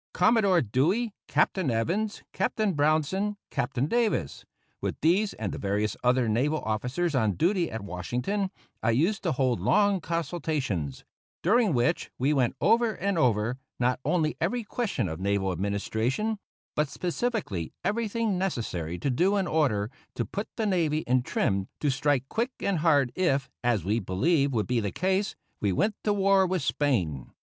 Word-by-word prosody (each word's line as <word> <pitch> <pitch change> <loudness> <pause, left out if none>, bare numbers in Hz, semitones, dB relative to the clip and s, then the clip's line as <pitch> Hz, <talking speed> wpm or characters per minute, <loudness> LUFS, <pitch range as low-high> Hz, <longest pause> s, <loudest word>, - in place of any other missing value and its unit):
Commodore 185 -3 +4
Dewey, 175 - +1
Captain 185 -7 +1
Evans, 175 - -1
Captain 215 -3 0
Brownson, 155 +7 +1
Captain 135 -1 -1
Davis 205 - 0 0.4
with - - -3
these 190 +7 +3
and 105 -4 -3
the - - -5
various 105 +2 0
other 125 -1 +3
naval 135 +8 +1
officers 125 +10 -1
on 110 -6 +2
duty 175 - +1
at 110 -2 -5
Washington 125 - -2 0.3
I - - +1
used 190 +8 +1
to 175 - 0
hold 130 -3 +1
long 200 -2 +3
consultations, 155 - -2 0.4
during 220 +2 +4
which 120 0 +1
we 135 +4 +2
went 130 -4 +1
over 230 -2 +3
and 200 0 -1
over, 120 -4 +1 0.2
not 125 +1 +1
only 160 -4 +1
every 225 +9 0
question 210 - -2
of 80 -1 -5
naval 100 0 0
administration, 110 - -1 0.4
but 150 -1 +1
specifically 180 - -2
everything 220 -2 0
necessary 90 - -2
to 135 - -1
do 185 +10 +2
in 195 - +1
order 130 - +1 0.2
to - - -1
put 205 +2 -4
the 225 - -1
navy 165 -6 +1
in 125 +1 +3
trim 100 -5 0
to 145 - +1
strike 135 -1 +1
quick 230 - -1
and 195 -4 0
hard 145 -6 +3
if, 140 -7 0
as 120 -7 +1
we 105 +4 +1
believed 140 - +1
would 110 -4 0
be 125 -1 +1
the 105 -3 -2
case, 190 +2 0 0.2
we 100 - +1
went 210 - +1
to 210 - +2
war 195 -1 +4
with 180 -4 -1
Spain. 115 - 0
150 Hz, 160 wpm, -27 LUFS, -, 0.4 s, Commodore